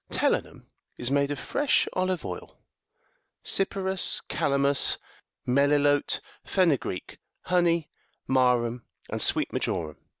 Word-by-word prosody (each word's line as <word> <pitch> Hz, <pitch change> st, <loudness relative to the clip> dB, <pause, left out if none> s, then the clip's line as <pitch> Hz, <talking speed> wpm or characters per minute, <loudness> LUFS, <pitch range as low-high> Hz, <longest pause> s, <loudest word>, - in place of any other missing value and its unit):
Telinum54 -, -, 0 dB, 0.3 s
is 120 Hz, +2 st, -1 dB
made 140 Hz, 0 st, +2 dB
of 145 Hz, -, -3 dB
fresh 285 Hz, -, +1 dB
olive 185 Hz, -1 st, -1 dB
oil, -, -, -7 dB, 0.9 s
cypirus,55 190 Hz, -1 st, +1 dB
calamus, 140 Hz, 0 st, +2 dB, 0.5 s
melilote,56 145 Hz, +2 st, +3 dB, 0.3 s
fenu 170 Hz, -9 st, +3 dB
greek, 90 Hz, -, -6 dB, 0.2 s
honey, 170 Hz, -3 st, +2 dB, 0.4 s
marum,57 125 Hz, -2 st, +2 dB, 0.3 s
and -, -, -2 dB
sweet -, -, +1 dB
marjoram. 75 Hz, -2 st, -2 dB
145 Hz, 100 wpm, -27 LUFS, 130-180 Hz, 0.9 s, melilote,56